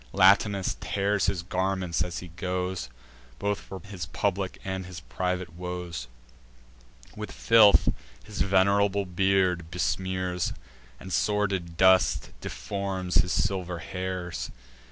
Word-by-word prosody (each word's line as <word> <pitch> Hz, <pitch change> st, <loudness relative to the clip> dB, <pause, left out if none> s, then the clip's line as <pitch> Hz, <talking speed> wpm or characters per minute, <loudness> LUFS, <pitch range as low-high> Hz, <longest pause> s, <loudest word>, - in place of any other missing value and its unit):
Latinus 100 Hz, 0 st, +4 dB
tears 100 Hz, 0 st, +1 dB
his 85 Hz, -3 st, -1 dB
garments 95 Hz, -1 st, -1 dB
as 90 Hz, -1 st, -5 dB
he -, -, -12 dB
goes, 90 Hz, -3 st, -3 dB, 0.5 s
Both 100 Hz, 0 st, -1 dB
for 95 Hz, -, -9 dB
his 95 Hz, -5 st, -6 dB
public 95 Hz, +1 st, -1 dB
and 95 Hz, 0 st, -3 dB
his 90 Hz, -2 st, -7 dB
private 90 Hz, +8 st, -3 dB
woes; 90 Hz, -3 st, -5 dB, 1.1 s
With -, -, -6 dB
filth 110 Hz, -3 st, +6 dB, 0.4 s
his 105 Hz, -, -4 dB
venerable 100 Hz, +1 st, +3 dB
beard 90 Hz, -2 st, +1 dB
besmears, 90 Hz, 0 st, -1 dB, 0.5 s
And 95 Hz, -1 st, -7 dB
sordid 95 Hz, -5 st, 0 dB
dust 95 Hz, -1 st, +4 dB
deforms 95 Hz, -2 st, -1 dB
his 90 Hz, -, -3 dB
silver 90 Hz, -1 st, 0 dB
hairs. 90 Hz, 0 st, -4 dB
95 Hz, 115 wpm, -27 LUFS, 90-100 Hz, 1.1 s, filth